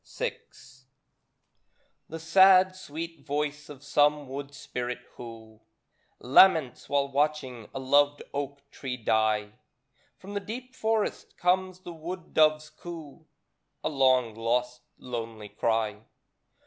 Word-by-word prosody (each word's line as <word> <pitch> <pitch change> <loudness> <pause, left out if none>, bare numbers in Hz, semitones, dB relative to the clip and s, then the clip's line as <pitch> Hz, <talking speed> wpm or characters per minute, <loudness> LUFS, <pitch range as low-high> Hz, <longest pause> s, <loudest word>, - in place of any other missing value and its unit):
VI - - -1 1.7
The 165 - -5
sad, 185 +3 +6
sweet 165 -3 -7
voice 150 0 -3
of 145 -2 -11
some 145 0 +2
wood 140 +2 -6
spirit 125 -4 -4 0.2
who 115 -2 -11 0.6
Laments 145 0 +4
while 140 -1 +2
watching 135 -5 -1
a - - -6
loved 145 +2 +3
oak 140 0 -5
tree 125 -2 -5
die, 110 -2 +1 0.7
From 195 +2 -10
the 205 - -1
deep 250 +5 -7
forest 220 -3 -1
comes 185 0 +1
the 175 - -8
wood 170 +2 -7
dove's 155 0 +3
coo. 165 -2 -10 0.6
A - - 0
long, 130 -5 +3
lost, 125 +2 -1 0.2
lonely 115 -4 -6
cry. 105 0 -1
145 Hz, 115 wpm, -28 LUFS, 125-165 Hz, 1.7 s, sad